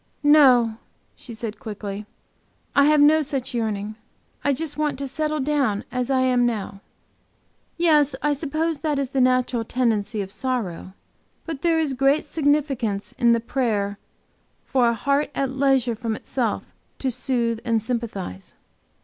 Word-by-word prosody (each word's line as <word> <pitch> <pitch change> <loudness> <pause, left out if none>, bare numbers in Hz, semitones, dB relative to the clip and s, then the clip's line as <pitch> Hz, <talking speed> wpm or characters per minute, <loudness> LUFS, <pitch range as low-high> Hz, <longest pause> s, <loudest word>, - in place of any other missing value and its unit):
"No," 255 -7 +5 0.4
she 235 - -10
said, 220 -1 -6
quickly, 210 -3 -6 0.7
"I 280 - +6
have 300 0 +4
no 305 +2 +6
such 270 -3 -3
yearning. 215 -2 -2 0.5
I 285 - +2
just 300 +2 -2
want 300 -2 -1
to 275 0 -4
settle 305 +2 -2
down 270 -7 0
as 250 0 -2
I 265 -1 +2
am 250 -1 +3
now." 205 -4 -2 1.0
"Yes, 300 -5 +4
I 295 0 +3
suppose 310 +2 -2
that 295 0 -1
is 275 -2 -1
the 265 - +1
natural 255 -2 +2
tendency 225 -3 0
of 190 - -9
sorrow. 205 -8 -3 0.5
But 320 -4 -5
there 335 -1 +2
is 305 -4 0
great 275 +3 +2
significance 275 -9 0
in 235 -2 +5
the 230 - +2
prayer 215 -5 -1 0.7
for 250 -3 +2
'a 235 - 0
heart 280 +6 0
at 270 -1 -1
leisure 265 -3 +2
from 225 0 -3
itself, 235 -1 -3 0.2
to 265 - -1
soothe 235 -2 -1
and 230 -2 +1
sympathize.'" 220 - -5
255 Hz, 150 wpm, -23 LUFS, 225-285 Hz, 1.0 s, I